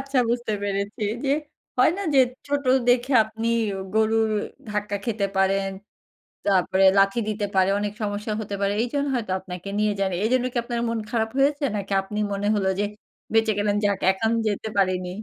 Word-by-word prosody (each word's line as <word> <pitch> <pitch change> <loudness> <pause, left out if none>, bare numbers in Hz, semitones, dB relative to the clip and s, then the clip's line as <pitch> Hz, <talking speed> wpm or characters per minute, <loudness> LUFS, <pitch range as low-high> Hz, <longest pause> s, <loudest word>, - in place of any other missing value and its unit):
আচ্ছা। 275 0 -1
বুঝতে 240 -2 -1
পেরেছি, 200 +1 -3 0.2
যে 275 - +1 0.5
হয় 255 - +6
না? 400 - -3
যে, - - +6 0.3
ছোট 285 -1 -1 0.2
দেখে 250 +2 +3
আপনি 220 +1 -5 0.5
গরুর 220 0 +2 0.4
ধাক্কা 210 -1 -2
খেতে 220 -4 0
পারেন। 195 0 +2 0.8
তারপরে 190 -1 +3
লাথি 195 +4 +4
দিতে 210 -1 -1
পারে, 190 0 +4
অনেক 205 0 -2
সমস্যা 210 +1 -2
হতে 205 -1 -4
পারে। 200 0 +1
এইজন্য 280 +4 -1
হয়তো 220 -6 -3
আপনাকে 185 0 -8
নিয়ে 210 0 +2
যায়নি। 190 -2 0
এইজন্য 250 +3 +2
কি - - -2
আপনার 235 0 -3
মন 230 -1 -1
খারাপ 225 -1 0
হয়েছে? 285 +2 +2
নাকি 200 -1 -3
আপনি 210 +2 -5
মনে 200 +1 -2
হল 200 -2 0
যে, 205 - +2 0.5
বেঁচে 225 -1 +4
গেলেন 205 0 +1
যাক 200 -1 +1
এখন 220 +4 -1 0.2
যেতে 215 +1 -2
পারিনি? 185 -2 +1
210 Hz, 175 wpm, -24 LUFS, 195-230 Hz, 0.8 s, হয়